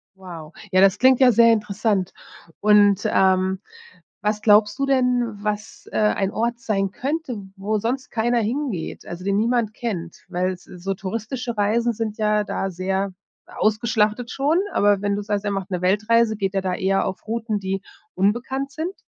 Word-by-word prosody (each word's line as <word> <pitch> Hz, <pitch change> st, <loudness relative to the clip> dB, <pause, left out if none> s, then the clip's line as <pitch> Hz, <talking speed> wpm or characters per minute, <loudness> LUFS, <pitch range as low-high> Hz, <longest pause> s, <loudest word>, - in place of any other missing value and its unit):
Wow. 170 Hz, -5 st, -10 dB, 0.2 s
Ja, 185 Hz, -, +4 dB
das 195 Hz, -1 st, +5 dB
klingt 260 Hz, 0 st, +5 dB
ja 260 Hz, -2 st, +7 dB
sehr 230 Hz, +1 st, +6 dB
interessant. 210 Hz, -2 st, -1 dB, 0.5 s
Und, 205 Hz, -1 st, +5 dB
ähm, 190 Hz, 0 st, +2 dB, 0.6 s
was 210 Hz, 0 st, -1 dB
glaubst 210 Hz, -1 st, +4 dB
du 275 Hz, -, +2 dB
denn, 250 Hz, -2 st, +2 dB, 0.2 s
was, 210 Hz, +1 st, -4 dB
äh, -, -, -1 dB
ein 205 Hz, -2 st, +1 dB
Ort 235 Hz, +2 st, -1 dB
sein 195 Hz, -4 st, -1 dB
könnte, 275 Hz, +1 st, -3 dB, 0.2 s
wo 210 Hz, +2 st, -1 dB
sonst 250 Hz, +5 st, -2 dB
keiner 235 Hz, +1 st, +1 dB
hingeht, 230 Hz, -, -3 dB
also 175 Hz, +1 st, -7 dB
den 200 Hz, +1 st, +1 dB
niemand 230 Hz, 0 st, +1 dB
kennt? 185 Hz, -9 st, -5 dB
Weil 185 Hz, +1 st, -1 dB
so 180 Hz, -, -15 dB
so 195 Hz, +3 st, -3 dB
touristische 225 Hz, +5 st, -4 dB
Reisen 230 Hz, +3 st, +1 dB
sind 220 Hz, -1 st, -4 dB
ja 210 Hz, -1 st, +2 dB
da 195 Hz, -1 st, -3 dB
sehr 190 Hz, +2 st, -2 dB, 0.3 s
ausgeschlachtet 220 Hz, +1 st, 0 dB
schon, 285 Hz, +6 st, +1 dB, 0.2 s
aber 205 Hz, -1 st, +3 dB
wenn 205 Hz, 0 st, 0 dB
du 205 Hz, -, -3 dB
sagst, 205 Hz, 0 st, -2 dB
er 205 Hz, -, 0 dB
macht 195 Hz, 0 st, -4 dB
'ne 180 Hz, -1 st, -2 dB
Weltreise, 215 Hz, +4 st, +2 dB
geht 195 Hz, -2 st, -2 dB
er 195 Hz, -, 0 dB
da 185 Hz, -1 st, -2 dB
eher 195 Hz, +1 st, +1 dB
auf 190 Hz, -, -5 dB
Routen, 225 Hz, -1 st, -2 dB
die 195 Hz, 0 st, -3 dB, 0.3 s
unbekannt 245 Hz, +8 st, -1 dB
sind? 320 Hz, +7 st, -4 dB
210 Hz, 175 wpm, -22 LUFS, 195-235 Hz, 0.6 s, ja